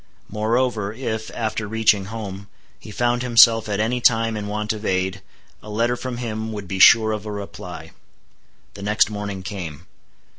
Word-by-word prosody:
Moreover, 110 0 0
if, 110 -2 -4
after 110 -1 -2
reaching 110 -2 +2
home, 100 -2 -7 0.3
he - - -12
found 120 +3 0
himself 115 -3 +5
at 100 0 -1
any 120 +3 0
time 115 -1 +3
in 105 -1 -4
want 105 +1 -2
of 105 0 -8
aid, 95 -1 -1 0.4
a 110 - -12
letter 115 +3 0
from 125 0 -5
him 110 -2 -4
would 105 -3 -6
be 95 +1 -4
sure 110 +2 +7
of 105 -1 -3
a - - -4
reply. 100 -1 -8 0.8
The 100 - -11
next 105 +2 +2
morning 100 -2 -5
came. 85 -5 -7
110 Hz, 170 wpm, -22 LUFS, 100-115 Hz, 0.8 s, sure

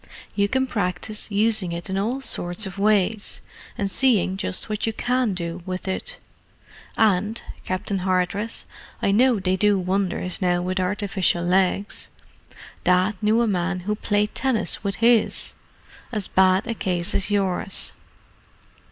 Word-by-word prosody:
You 200 0 +1
can 265 +3 +1
practise 210 -2 -3
using 210 -3 +2
it 170 0 -5
in 190 - -3
all 230 +7 -1
sorts 175 -5 0
of 190 0 -7
ways, 210 0 +1 0.4
and 200 -1 -1
seeing 215 -8 +3
just 190 -1 -2
what 215 0 -2
you 225 - 0
can 245 -3 0
do 170 0 -3
with 185 +1 -5
it. - - -4 0.8
And, 210 +1 +2 0.3
Captain 185 +1 -1
Hardress, 185 +4 -1 0.3
I - - +1
know 240 +2 +4
they 185 0 +1
do 205 +1 +3
wonders 185 0 -1
now 175 -1 +2
with 185 +1 -1
artificial 190 -2 0
legs: 190 +3 +1 0.7
Dad 185 +3 +3
knew 220 +2 +3
of - - +4
a - - +1
man 180 0 -1
who 210 +4 -1
played 210 0 0
tennis 260 -5 0
with 200 -1 -1
his—as 230 -1 +3 0.8
bad 190 +1 +4
a 230 - -2
case 180 -5 -2
as 195 - 0
yours." 195 -1 0
195 Hz, 145 wpm, -23 LUFS, 185-215 Hz, 0.8 s, know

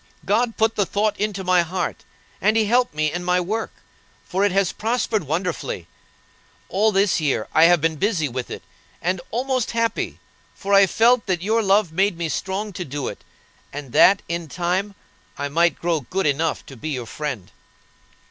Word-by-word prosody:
God 230 +5 +1
put 220 0 +2
the 205 - +2
thought 210 +1 0
into 205 -2 -2
my 180 -1 +4
heart, 175 +1 -3 0.4
and 215 +2 +3
He 220 - +3
helped 240 -4 +2
me 155 0 +1
in 175 +2 -4
my 180 0 +2
work, 215 +6 -2 0.5
for 195 +1 -1
it 205 - +3
has 195 -1 +2
prospered 220 -3 -1
wonderfully. 155 - -3 0.8
All 215 +3 +2
this 195 -3 +2
year 140 -7 0
I 160 - +6
have 175 -2 +5
been 160 0 0
busy 190 -4 +1
with 125 -1 -5
it, - - -7 0.4
and 180 +1 -1
almost 255 0 -1
happy; 230 0 -1 0.4
for 200 +1 -3
I 195 0 +7
felt 230 +3 +3
that 180 -2 -1
your 220 +3 +2
love 200 -3 +3
made 190 +1 +1
me 170 -1 -2
strong 200 +5 -3
to 180 - -4
do 145 -2 -4
it, - - -10 0.5
and 145 -3 -7
that, 195 +9 +5
in 170 -1 -3
time, 185 +5 -2 0.4
I 145 0 -3
might 170 +4 +2
grow 170 -2 0
good 190 +9 -2
enough 150 +2 0
to 135 - -11
be 130 +6 -6
your 130 -5 -3
friend." 130 -5 -5
185 Hz, 185 wpm, -22 LUFS, 160-210 Hz, 0.8 s, I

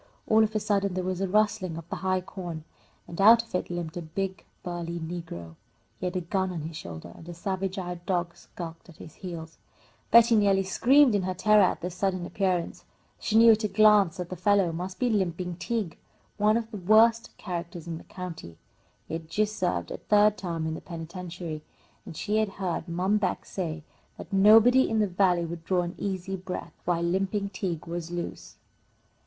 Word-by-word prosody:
All 220 0 +5
of 220 0 -1
a - - +3
sudden 200 -2 0
there 185 - -1
was 185 0 -2
a 195 - +1
rustling 205 -3 +1
of 165 0 -9
the - - -3
high 185 0 0
corn, 175 -4 -7 0.4
and 170 +3 -4
out 230 +3 +8
of 230 - -21
it 180 - -1
limped 175 -1 -4
a 175 - -4
big 190 +4 -4 0.2
burly 170 -1 -4
negro. 160 - -7 0.4
He 180 - -2
had 180 - -4
a 185 - 0
gun 190 +2 -1
on 170 -3 -4
his 160 +1 -6
shoulder, 85 - -8
and 165 - -12
a 175 - -7
savage 190 +1 -3
eyed 175 -2 -5
dog 175 -2 -1
skulked 165 0 -10
at 165 - -15
his 160 - -11
heels. 165 -3 -8 0.5
Betty 235 0 +7
nearly 200 -2 +3
screamed 255 +7 +4
in 205 - +2
her 185 0 -2
terror 210 +3 +5
at 185 - +2
this 180 0 -4
sudden 185 -1 -1
appearance. 185 -3 -1 0.4
She 220 - -2
knew 230 0 +8
at 220 0 +2
a - - +2
glance 205 -3 +5
that 180 -1 -5
the - - -3
fellow 195 0 +2
must 180 +3 -5
be 250 - +1
"Limping 180 -5 -1
Tige," 200 -2 -3 0.4
one 210 +1 +3
of 230 -1 -4
the 210 - -5
worst 220 +5 +4
characters 175 -3 -6
in 165 -2 -5
the - - -13
county. 165 - -8 0.5
He - - -7
had 165 -1 -5
just 215 +4 0
served 180 -4 -1
a - - -4
third 210 0 +4
term 170 -4 -4
in 160 - -2
the - - -6
penitentiary, 170 -1 -7 0.5
and 160 - -8
she 210 +4 -1
had 215 -1 +2
heard 190 -2 -3
Mom 185 +5 +1
Beck 195 -3 -1
say 165 -4 -4 0.3
that - - -10
nobody 225 +6 +6
in 225 - 0
the 215 - +3
Valley 180 -2 +2
would 165 0 -7
draw 180 0 +1
an 175 0 -5
easy 190 -1 -3
breath 185 0 -6
while 170 -1 +1
Limping 195 +3 0
Tige 180 -4 -4
was 170 -1 -5
loose. 175 0 -6
185 Hz, 205 wpm, -27 LUFS, 170-205 Hz, 0.5 s, out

